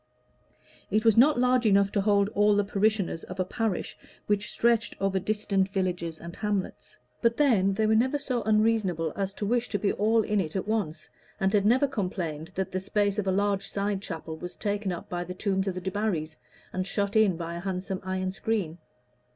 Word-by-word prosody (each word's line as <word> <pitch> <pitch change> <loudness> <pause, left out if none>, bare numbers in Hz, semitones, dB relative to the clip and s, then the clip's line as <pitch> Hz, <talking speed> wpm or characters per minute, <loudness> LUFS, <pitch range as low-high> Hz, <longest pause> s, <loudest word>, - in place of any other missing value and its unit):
It 215 +3 +1
was 225 -2 +6
not 275 +5 +6
large 250 -1 +3
enough 200 -1 +4
to 200 - +1
hold 200 -1 +3
all 210 0 +3
the 205 - +3
parishioners 200 -3 0
of 185 +1 -9
a 185 - +1
parish 220 0 -2 0.3
which 205 0 0
stretched 235 -1 +1
over 195 -1 +1
distant 200 -1 0
villages 180 -4 -2
and 170 +1 -9
hamlets; 205 -3 -3 0.2
but 230 0 +2
then 205 -10 +3
they 220 +1 +1
were 215 - +3
never 255 +6 +3
so 255 -4 -2
unreasonable 215 -7 +1
as 195 -1 -2
to 205 - -4
wish 240 +3 0
to 205 - 0
be 200 0 0
all 220 +2 +2
in 210 -2 +1
at 180 +4 -3
once, 180 -8 -2 0.3
and 190 +1 +1
had 205 -1 +3
never 255 +5 +4
complained 180 - -3
that 190 -1 -2
the 185 - -1
space 205 +1 0
of 200 - -2
a - - +3
large 200 0 0
side 200 -1 -2
chapel 165 -4 -6
was 180 +2 -7
taken 205 -2 -2
up 175 - -6
by 175 0 -3
the 180 +1 -7
tombs 190 0 -1
of 190 - -1
the 185 - -4
Debarrys, 185 -5 -2 0.4
and 185 0 -2
shut 200 +1 -1
in 210 -6 +4
by 170 0 -5
a 170 - -5
handsome 190 0 -3
iron 185 0 -2
screen. 195 -5 -2
200 Hz, 200 wpm, -27 LUFS, 185-215 Hz, 0.4 s, was